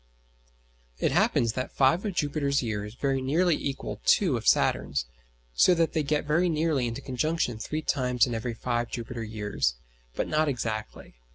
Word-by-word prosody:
It - - +1
happens 115 -2 +2
that 130 +1 -3
five 140 +7 +3
of 200 -4 -3
Jupiter's 140 -3 0
years 105 -1 -4
very 135 +1 0
nearly 160 +6 +2
equal 140 -2 -5
two 180 -10 +4
of 115 -2 -4
Saturn's, 70 -3 +2 0.5
so 175 - +5
that 165 -1 +1
they 160 - +1
get 150 0 0
very 165 +4 +2
nearly 155 -5 +1
into 115 +4 -5
conjunction 130 -3 -1
three 155 +7 -4
times 125 -5 +2
in 120 - -4
every 115 +1 -3
five 120 0 -2
Jupiter 120 0 -5
years, 105 - -1 0.4
but - - -1
not 155 0 +1
exactly. 110 -5 -4
130 Hz, 165 wpm, -27 LUFS, 115-155 Hz, 0.5 s, so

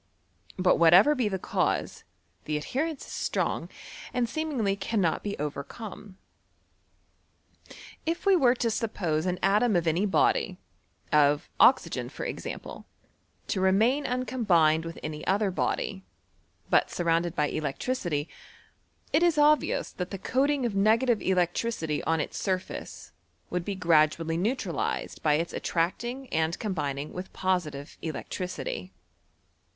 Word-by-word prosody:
But 185 -1 +3
whatever 175 - +7
be 250 -7 0
tlie 190 -2 -2
cause, - - -1 0.4
the 150 0 -1
adhe 150 - -7
jHon 310 +3 0
is - - -11
strong, - - -2 0.4
and 245 -1 0
seemingly 245 -7 -1
cannot 195 -3 0
be 205 -1 -4
overcome. 185 - -6 1.9
If 335 +3 -2
we 395 -1 +6
were 255 -7 +4
to 235 -2 0
suppose 180 -8 -1
an 180 0 0
atom 210 +3 +3
of 170 -1 +2
any 170 +6 +2
body, 190 -1 +2 0.5
of 145 -1 +3
oxygen - - +4
for - - -6
example, - - -6 0.6
to 190 - 0
remain 220 +10 +3
uncombined 200 -11 +2
with 165 - -7
any 155 -1 -5
other 200 +1 +2
body, 95 - -2 0.6
but - - +3
surrounded 170 0 0
by 150 -1 +1
electricity, 155 - -2 0.9
it 310 - +4
is 345 -2 +4
cbvious 300 +1 +3
that 180 -1 -3
the 195 - -5
coating 270 +6 +1
of 230 - -1
negative 220 +4 +3
electricity 175 -3 0
<hi 165 - +3
its - - -5
surface 185 -1 -4 0.4
would 180 -1 -1
be 200 +2 -3
gradually 165 -2 +2
neutralized 220 +10 -2
by 150 -1 +3
its 165 +2 -2
ati - - -4
tracdng 240 +10 -1
and 160 +1 0
combining 150 -8 -3
v^th 180 +1 -7
positive 170 -7 -2
electricity. 155 - -5
185 Hz, 130 wpm, -28 LUFS, 160-235 Hz, 1.9 s, whatever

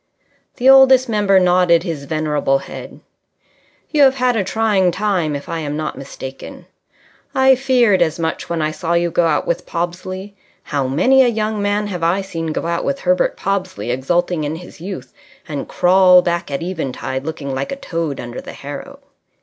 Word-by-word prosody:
The 250 - 0
Oldest 265 -1 +7
Member 205 -3 +3
nodded 180 -2 +3
his 160 -6 -5
venerable 150 -2 0
head. - - -10 0.9
"You 300 - +2
have 270 -1 +6
had 250 -2 +1
a 210 - +1
trying 195 -1 +1
time, 180 -5 -1
if 140 - -7
I 165 - -3
am 150 -1 -4
not 155 - -3
mistaken. 135 -1 -9 0.7
I 265 0 +6
feared 250 -7 +3
as 160 -2 +1
much 165 -1 -3
when 170 -2 -1
I 155 - 0
saw 165 +2 -3
you 170 0 +1
go 170 +1 +2
out 150 -2 0
with 170 - -2
Pobsley. 185 +3 -5 0.3
How 140 -3 -2
many 255 - +4
a - - +3
young 215 -2 -1
man 205 +1 0
have 185 -4 -5
I 170 +4 +1
seen 165 -4 -5
go 155 - -3
out 170 0 -1
with 280 0 -2
Herbert 180 0 +1
Pobsley 185 -8 -2
exulting 170 +6 0
in 150 +2 -2
his 175 -1 -12
youth, 190 +2 -7 0.3
and 145 -4 -5
crawl 180 0 +5
back 170 -2 -2
at 140 +3 -3
eventide 135 -6 -4
looking 145 -3 -5
like 135 +1 -3
a - - -2
toad 165 - -4
under 120 0 -6
the - - -10
harrow! - - -9
175 Hz, 180 wpm, -18 LUFS, 155-205 Hz, 0.9 s, Oldest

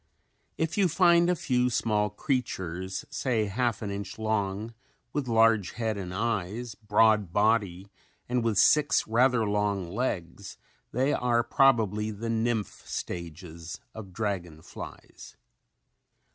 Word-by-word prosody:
If 160 +5 -1
you 195 - +5
find 170 0 +4
a 180 - +3
few 125 -5 +1
small 105 -3 +1
creatures, 95 - -3
say 115 -5 0
half 115 +3 -1
an 100 - -3
inch 100 -1 -6
long 110 0 -2 0.4
with 145 -3 -2
large 115 -4 +3
head 110 -2 -2
and 95 -3 -5
eyes, 110 +2 -2
broad 105 -2 +2
body 100 -2 +1 0.4
and 125 -1 0
with 115 -3 0
six 150 +5 +4
rather 120 +1 +3
long 100 -3 -1
legs 100 -5 -3 0.3
they 130 +4 +1
are 120 -1 +2
probably 110 -6 +3
the 110 +2 -4
nymph 115 -1 -1
stages 85 -1 -6
of 105 -4 -9
dragon 90 -6 -4
flies. - - -11
110 Hz, 125 wpm, -28 LUFS, 100-120 Hz, 0.4 s, you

